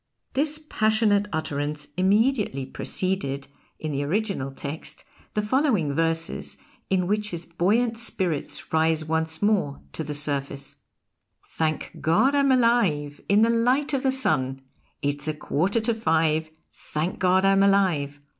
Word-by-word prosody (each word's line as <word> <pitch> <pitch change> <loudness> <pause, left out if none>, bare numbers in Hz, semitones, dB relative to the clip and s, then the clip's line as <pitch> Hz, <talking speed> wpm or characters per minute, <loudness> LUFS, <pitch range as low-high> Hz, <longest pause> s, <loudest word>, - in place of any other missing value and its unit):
This 300 +2 +1
passionate 215 -3 +2
utterance 150 -1 -3
immediately 200 - +2
preceded, 140 -2 -2 0.3
in 155 - -4
the 140 0 -1
original 190 -3 -1
text, 140 +3 -6 0.3
the 210 - +1
following 210 - +1
verses 165 +2 -1 0.3
in 185 -2 +2
which 210 +2 0
his 170 -2 -6
buoyant 220 +8 +1
spirits 180 -13 -2
rise 160 0 +2
once 160 +2 -1
more 200 -10 +1
to 160 - -3
the 150 0 -3
surface: 140 -1 -1 0.7
Thank 155 -1 -2
God 170 - +3
I'm 280 -1 +3
alive 220 - +2
In 205 +2 +5
the 230 - +4
light 250 +6 +2
of 270 - +1
the 265 - +2
Sun! 135 - 0 0.4
It's 145 +1 -1
a 155 - -1
quarter 180 +8 0
to 230 +1 +1
five; 160 -6 +1 0.2
Thank 155 +4 -4
God 185 +1 +3
I'm 195 0 +4
alive! 175 -8 +2
175 Hz, 135 wpm, -25 LUFS, 150-220 Hz, 0.7 s, In